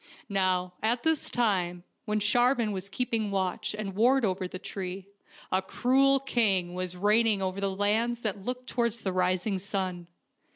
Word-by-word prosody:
Now, 185 -2 +1
at 235 +2 +1
this 320 -2 +1
time, 180 -7 0 0.2
when 215 -1 0
Sharvan 240 +2 +2
was 195 0 -4
keeping 225 -1 -1
watch 190 +1 -1
and 200 -2 -4
ward 245 +5 +3
over 185 -1 -1
the 185 - -6
tree, 185 0 -6 0.5
a 185 - +2
cruel 270 +7 +3
king 205 -10 +1
was 180 0 -3
reigning 210 +2 +3
over 190 +1 -2
the 200 - +1
lands 220 +5 0
that 205 -2 -2
looked 250 +3 -4
towards 235 -2 -1
the 190 - -2
rising 185 +2 0
sun. 185 -3 -3
200 Hz, 160 wpm, -28 LUFS, 185-235 Hz, 0.5 s, ward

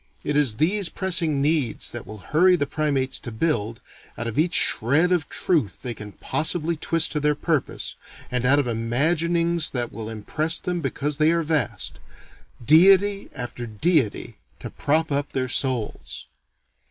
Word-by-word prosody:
It 145 - -2
is 140 -7 +2
these 185 +5 +1
pressing 165 -6 +1
needs 145 -6 0
that 120 - -8
will 110 - -9 0.2
hurry 180 +4 +5
the 145 - 0
primates 140 -3 -2
to 120 - -8
build, 115 -2 -2 0.4
out 120 - -4
of 115 +4 -3
each 170 +2 +2
shred 145 +10 +3
of 175 -3 0
truth 150 - -1
they 125 -2 -3
can 105 -2 -9
possibly 165 +1 -1
twist 160 +1 +2
to 150 - -1
their 150 0 +1
purpose, 155 -2 -2 0.4
and 125 -1 -1
out 135 +3 +4
of 145 - +1
imaginings 160 +8 +1
that 120 -2 -3
will 110 -1 -6
impress 150 +9 -1
them 180 -1 -3
because 145 +1 -3
they 155 0 +3
are 170 0 +1
vast, 150 -7 -2 0.7
deity 195 - +5
after 120 -2 -6
deity 130 - -1 0.2
to - - -8
prop 160 +2 0
up 140 0 -2
their 130 -1 -1
souls. 125 -3 -2
150 Hz, 160 wpm, -23 LUFS, 120-165 Hz, 0.7 s, hurry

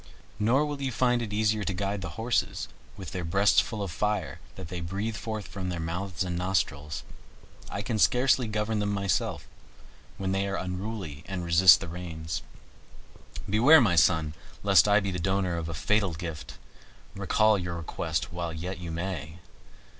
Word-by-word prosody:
Nor 125 +8 +3
will 145 -1 -4
you 135 -1 -1
find 125 0 +2
it 110 -3 -4
easy 105 0 +1
to 100 - -1
guide 100 +1 -2
those 90 -4 -6
horses, 115 +1 -1 0.3
with 90 -4 -7
their 90 - -4
breasts 100 +5 +4
full 110 -3 -4
of 95 - -4
fire 105 +5 -1 0.2
that 95 -3 -8
they 90 -1 -5
breathe 100 +6 -3
forth 110 -1 -4
from 95 -2 -5
their 90 -2 -3
mouths 85 +3 -3
and 90 -1 -3
nostrils. 80 -5 -1 0.7
I - - -4
can 110 -2 -2
scarcely 125 +1 +3
govern 105 0 -1
them 105 0 0
myself, 95 -6 -1 0.7
when 95 -1 -2
they 95 +1 0
are 100 - -2
unruly 90 -5 -5
and 90 -3 -4
resist 85 +1 +7
the - - -5
reins. 80 -3 -5 1.1
Beware, 120 +11 +7
my 105 -9 +3
son, 80 0 +3 0.3
lest 100 -2 +6
I 100 0 +5
be 100 -1 -2
the 90 - -3
donor 95 0 0
of 85 -1 -4
a 80 - -4
fatal 100 +2 +1
gift; 80 -5 -7 0.6
recall 110 -1 +3
your 90 -1 -4
request 80 -1 -3
while 85 -1 -3
yet 85 +3 -5
you 85 -1 -6
may. 85 -2 -4
95 Hz, 175 wpm, -28 LUFS, 85-105 Hz, 1.1 s, resist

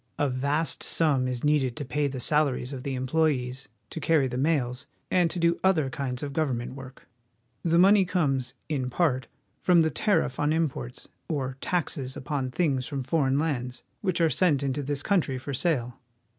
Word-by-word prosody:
A 145 - +2
vast 140 +5 0
sum 140 -6 +2
is 125 -1 -3
needed 145 -5 +2
to 145 - -5
pay 145 +2 0
the 130 -2 -5
salaries 140 -1 +1
of 130 - -5
the 135 0 -3
employees, 130 -1 0 0.2
to - - -5
carry 150 -2 +3
the 125 - -5
mails, 130 -2 0 0.2
and 180 -2 +3
to 180 - -5
do 170 0 +2
other 160 -8 +2
kinds 130 -2 -4
of 140 -1 -4
government 130 -6 -1
work. 135 -1 -11 0.5
The 170 0 +2
money 195 +3 +6
comes, 135 -8 -1
in 135 -5 -2
part, 130 -4 0 0.3
from 175 -2 +4
the 160 - +1
tariff 130 - +1
on 145 +1 +2
imports, 140 - -3 0.2
or 135 -4 -2
taxes 145 -7 -2
upon 130 0 -2
things 135 -3 0
from 140 -3 -3
foreign 135 -1 +1
lands 130 -5 -2 0.2
which 185 -4 0
are 165 -2 +3
sent 150 -7 +2
into 140 +1 -1
this 145 0 -2
country 170 -10 +1
for 135 +2 -6
sale. 125 -5 -1
140 Hz, 180 wpm, -27 LUFS, 130-160 Hz, 0.5 s, money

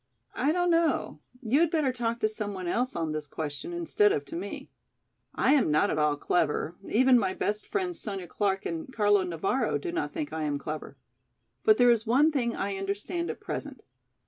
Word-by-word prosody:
"I 280 +4 +1
don't 355 +1 +2
know, 330 -1 +1 0.2
you 245 +6 +2
had 340 -1 +4
better 305 -6 +1
talk 235 -1 -2
to 215 - +4
some 215 -2 -4
one 185 -1 -5
else 245 +9 -1
on 165 -2 -1
this 155 -1 -4
question 150 - -5
instead 345 +5 +2
of 425 +1 -1
to 330 - -8
me. 345 - -6 0.6
I 270 - +3
am 275 - +3
not 150 0 +3
at 155 - -1
all 150 -1 +2
clever, 155 +1 0
even 255 +4 +4
my 190 -3 -1
best 210 +1 -2
friends, 370 -4 -2
Sonya 195 -4 -4
Clark 195 +2 -1
and 165 +8 -4
Carlo 205 -4 +3
Navara, 195 +8 -1
do 355 - -4
not 355 +1 -2
think 310 -3 -4
I 160 - -3
am 145 -2 -1
clever. 150 -1 -6 0.7
But 215 0 +5
there 245 -1 +6
is 230 -1 +1
one 280 +7 +4
thing 240 -5 0
I 195 0 -2
understand 200 - -3
at - - -5
present. - - -6
220 Hz, 200 wpm, -28 LUFS, 180-300 Hz, 0.7 s, there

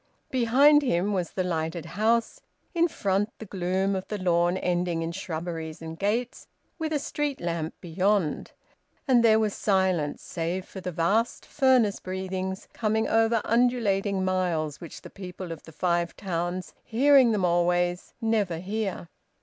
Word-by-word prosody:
Behind 270 +4 +5
him 205 -6 0
was 180 -4 -1
the 185 - -2
lighted 165 -1 -2
house; 220 +6 0 0.3
in 340 -1 +3
front 200 - 0
the 220 - -8
gloom 190 +1 -1
of 185 - -4
the 210 - -3
lawn 175 -1 +2
ending 175 -2 0
in 165 - -3
shrubberies 165 -3 -5
and 160 0 -8
gates, 230 +5 -1 0.3
with 315 -1 -2
a 305 - +2
street 290 0 -3
lamp 165 -2 -3
beyond. 180 0 0 0.6
And 245 -3 +5
there 220 -1 +6
was 215 -2 +1
silence, 185 -7 0
save 175 +2 -3
for 190 - -9
the 180 - -4
vast 195 +8 0
furnace 255 -7 +3
breathings, 190 0 -4
coming 220 0 0
over 225 0 +3
undulating 210 -5 +1
miles, 170 -5 -1
which 170 - -9
the - - -10
people 185 -2 -8
of 165 - -7
the 160 - -13
Five 170 +1 0
Towns, 175 -1 -3
hearing 265 +1 +5
them 205 -4 +1
always, 175 +1 +1
never 215 -7 0
hear. 195 0 -3
190 Hz, 150 wpm, -27 LUFS, 175-220 Hz, 0.6 s, there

